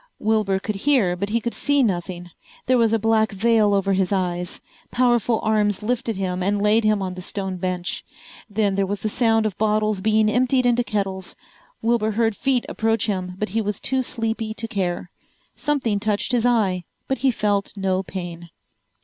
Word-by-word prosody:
Wilbur 215 -3 +1
could 205 +1 -4
hear 215 -7 +2
but 200 +3 -3
he 230 +2 +1
could 235 +1 -3
see 285 -1 +2
nothing. 175 -3 -2 0.3
There 255 -1 +3
was 225 -2 +3
a 225 - +3
black 220 0 +2
veil 215 +1 +3
over 195 0 +1
his 190 -1 +1
eyes. 180 -2 -2 0.3
Powerful 240 -2 +2
arms 210 -2 +1
lifted 230 -1 -1
him 185 -1 -2
and 200 +2 +1
laid 210 +2 +3
him 215 -2 +2
on 185 -1 -3
the 185 - -7
stone 190 0 -4
bench. 180 -1 -3 0.5
Then 205 -1 +1
there 195 0 0
was 200 +1 -3
the 215 - -1
sound 225 -1 +2
of 215 - -1
bottles 215 -2 +1
being 215 +1 +3
emptied 255 +3 +2
into 245 0 +3
kettles. 195 -4 -3 0.5
Wilbur 225 -2 +1
heard 225 0 +1
feet 260 0 +1
approach 225 0 0
him 185 -3 -3
but 210 0 -2
he 225 +4 0
was 210 -1 -3
too 265 0 0
sleepy 225 -2 -3
to 225 +1 -4
care. 185 -5 -2 0.4
Something 260 -9 0
touched 210 +3 0
his 245 -1 +2
eye 195 -7 +1 0.2
but 265 -2 -1
he 265 +2 +3
felt 205 -4 0
no 190 -1 0
pain. 175 -3 -7
210 Hz, 185 wpm, -22 LUFS, 190-225 Hz, 0.5 s, There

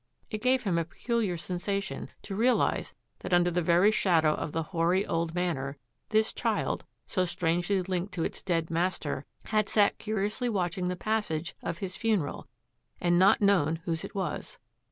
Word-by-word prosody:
It 215 -1 -3
gave 255 0 +3
him 180 -6 +1
a - - +1
peculiar 215 0 -1
sensation 195 +4 -3
to 195 - -5
realise 240 +4 +2 0.2
that 185 -1 +1
under 175 0 +3
the 175 +1 +1
very 175 +5 +5
shadow 165 -7 +3
of 150 - -4
the 165 +1 -1
hoary 175 +3 +1
old 165 0 -1
Manor 150 -6 -1 0.3
this 220 0 +2
child, - - -1 0.2
so 185 - 0
strangely 175 +2 0
linked 185 +1 -2
to 165 - -1
its - - -3
dead 165 -3 -1
master, 165 -5 -1 0.2
had 215 -2 +1
sat 205 -2 +3
curiously 215 +3 -1
watching 180 -3 -1
the 180 - -1
pas 215 +3 0
sage 160 +1 -3
of 170 - -3
his 190 -2 -5
funeral, 200 -10 -1 0.5
and 175 0 +3
not 195 +4 +5
known 180 -6 +4
whose 165 -2 -1
it - - -8
was. 195 - -3
180 Hz, 175 wpm, -29 LUFS, 170-205 Hz, 0.5 s, very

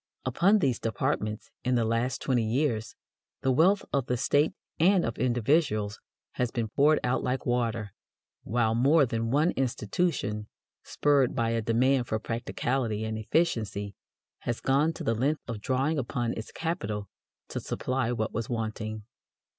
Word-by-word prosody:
Upon 175 - +4
these 135 - +1
departments, 105 0 -2
in 125 0 +1
the 115 -2 +2
last 115 +3 0
twenty 125 -4 +2
years, 115 -1 0 0.5
the 130 - +3
wealth 180 +9 +4
of 135 -3 +1
the 125 - 0
State 145 +6 +2 0.3
and 180 +3 +4
of 115 - -4
individuals 120 -4 +1 0.3
has 125 -1 -1
been 115 -2 -2
poured 150 +7 +4
out 125 +1 +1
like 130 0 -2
water, 115 -4 -1 0.5
while 115 +1 +1
more 140 +6 +5
than 115 -2 -2
one 150 +7 +3
institution, 115 - -1 0.3
spurred 140 -4 +2
by 115 -3 +1
a 115 0 0
demand 125 +3 +2
for 110 - 0
"practicality" 115 0 -2
and 110 0 -3
"efficiency," 110 - 0 0.5
has 120 - -3
gone 140 +4 +2
to - - -7
the 115 - +1
length 140 +7 0
of 115 -3 -5
drawing 135 +5 0
upon 120 -2 -2
its 110 - -7
capital 110 - -3 0.4
to - - -3
supply 130 -2 -2
what 110 -3 -2
was 115 +1 -3
wanting. 110 -2 -3
120 Hz, 155 wpm, -28 LUFS, 110-140 Hz, 0.5 s, more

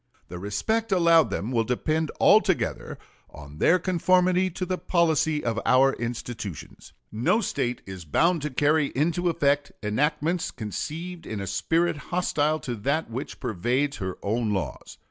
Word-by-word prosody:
The 90 0 -7
respect 200 - -1
allowed 170 -3 +5
them 110 +5 -3
will 115 -3 +2
depend 155 +7 -1
altogether 205 -4 +2 0.3
on 75 0 -12
their 180 - +5
conformity 185 +1 +2
to 185 +1 -4
the 185 0 -2
policy 160 -3 +1
of 115 -1 0
our 135 +1 +4
institutions. 115 -5 -6 0.2
No 115 - +2
State 130 - -2
is 95 -2 -8
bound 165 - +2
to 150 - -2
carry 145 +2 +2
into 170 +5 +1
effect 145 -3 +1
enactments 150 +10 0
conceived 160 - -6
in 110 - -4
a 100 - -4
spirit 165 - 0
hostile 155 -3 0
to 125 - -4
that 140 +6 -1
which 130 +5 -6
pervades 125 +5 -1
her 95 -2 -4
own 110 +1 0
laws.... 85 -10 -4
145 Hz, 145 wpm, -25 LUFS, 115-170 Hz, 0.3 s, allowed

